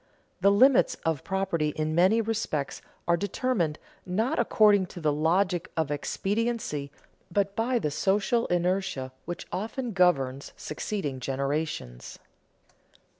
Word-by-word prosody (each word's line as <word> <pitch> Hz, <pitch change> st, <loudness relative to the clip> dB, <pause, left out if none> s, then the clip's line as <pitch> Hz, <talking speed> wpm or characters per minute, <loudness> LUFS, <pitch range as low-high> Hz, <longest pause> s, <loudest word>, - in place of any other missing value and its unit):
The 195 Hz, +2 st, +5 dB
limits 250 Hz, +6 st, +5 dB
of 160 Hz, -4 st, 0 dB
property 190 Hz, -5 st, 0 dB
in 155 Hz, 0 st, -1 dB
many 190 Hz, +7 st, +4 dB
respects 210 Hz, -10 st, -2 dB, 0.3 s
are 170 Hz, -, +4 dB
determined, 185 Hz, -3 st, -1 dB, 0.3 s
not 220 Hz, -, 0 dB
according 205 Hz, -3 st, +4 dB
to 175 Hz, -, -9 dB
the 155 Hz, -3 st, +1 dB
logic 175 Hz, +4 st, +1 dB
of 160 Hz, -2 st, 0 dB
expediency, 195 Hz, -1 st, -2 dB, 0.4 s
but 200 Hz, +2 st, 0 dB
by 240 Hz, +3 st, +1 dB
the 150 Hz, -10 st, -1 dB
social 205 Hz, +8 st, +1 dB
inertia 175 Hz, -6 st, 0 dB
which 175 Hz, +1 st, -5 dB
often 230 Hz, +5 st, -3 dB
governs 140 Hz, -8 st, +1 dB
succeeding 150 Hz, -4 st, -4 dB
generations. 135 Hz, -, -3 dB
180 Hz, 120 wpm, -27 LUFS, 150-205 Hz, 0.4 s, The